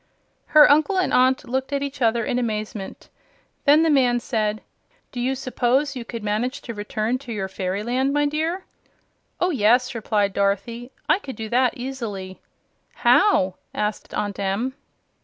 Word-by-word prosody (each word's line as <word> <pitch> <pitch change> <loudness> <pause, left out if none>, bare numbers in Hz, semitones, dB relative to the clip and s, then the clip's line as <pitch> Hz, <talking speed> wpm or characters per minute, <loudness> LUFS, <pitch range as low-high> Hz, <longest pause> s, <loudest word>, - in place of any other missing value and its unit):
Her 305 -1 +8
uncle 310 +7 +3
and 370 - +1
aunt 260 +2 +3
looked 265 +3 -2
at 280 0 -1
her 235 -4 0
in 245 - 0
amazement. 215 -4 -4 0.6
Then 300 +2 +6
the 325 - +3
man 250 -4 +3
said: 215 -3 -2 0.5
"Do 245 - -6
you 260 +2 0
suppose 265 +2 0
you 250 - -5
could 230 -1 -7
manage 220 +6 -1
to 235 - -6
return 215 +3 -2
to 250 -3 -9
your 200 -3 -3
fairyland, 210 +9 -1
my 290 +1 +2
dear?" 320 +5 -2 0.7
"Oh 360 +1 +2
yes," 250 -1 +3
replied 210 -3 0
Dorothy; 205 +6 -1 0.2
"I - - +3
could 270 -10 -8
do 220 -1 -6
that 250 +1 +2
easily." 225 -8 -6 0.5
"How?" 245 - +3 0.2
asked 210 0 -3
Aunt 205 -1 -3
Em. 200 +7 -1
245 Hz, 155 wpm, -23 LUFS, 210-270 Hz, 0.7 s, Her